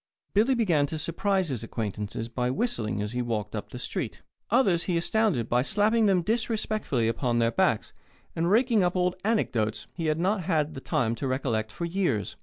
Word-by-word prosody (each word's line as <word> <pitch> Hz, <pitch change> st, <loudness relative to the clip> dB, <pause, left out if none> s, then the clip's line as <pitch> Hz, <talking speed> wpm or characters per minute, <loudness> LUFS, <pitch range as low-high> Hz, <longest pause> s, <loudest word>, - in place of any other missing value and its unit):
Billy 230 Hz, +6 st, +4 dB
began 170 Hz, -11 st, +2 dB
to 160 Hz, -, -4 dB
surprise 180 Hz, +3 st, 0 dB
his 125 Hz, -4 st, -3 dB
acquaintances 110 Hz, 0 st, -4 dB
by 125 Hz, +1 st, -1 dB
whistling 115 Hz, -, -1 dB
as 105 Hz, -, -4 dB
he 125 Hz, +1 st, -1 dB
walked 110 Hz, -3 st, -3 dB
up -, -, -5 dB
the -, -, -8 dB
street; -, -, -4 dB, 0.3 s
others 200 Hz, -8 st, +3 dB
he 175 Hz, -3 st, +1 dB
astounded 180 Hz, -, +1 dB
by 120 Hz, +1 st, +2 dB
slapping 210 Hz, -, +2 dB
them 185 Hz, -3 st, +3 dB
disrespectfully 215 Hz, -, 0 dB
upon 120 Hz, +1 st, 0 dB
their 115 Hz, 0 st, +2 dB
backs -, -, +1 dB, 0.4 s
and 170 Hz, +1 st, +1 dB
raking 230 Hz, +1 st, +4 dB
up 180 Hz, 0 st, +1 dB
old 180 Hz, 0 st, +1 dB
anecdotes 120 Hz, -, 0 dB
he 165 Hz, -3 st, -3 dB
had 155 Hz, 0 st, +1 dB
not 190 Hz, +3 st, +1 dB
had 155 Hz, -3 st, +1 dB
the 135 Hz, -, -7 dB
time 130 Hz, -8 st, 0 dB
to 125 Hz, +4 st, -3 dB
recollect 115 Hz, -5 st, -1 dB
for 170 Hz, -, -4 dB
years. 170 Hz, -, -1 dB
160 Hz, 190 wpm, -27 LUFS, -, 0.4 s, Billy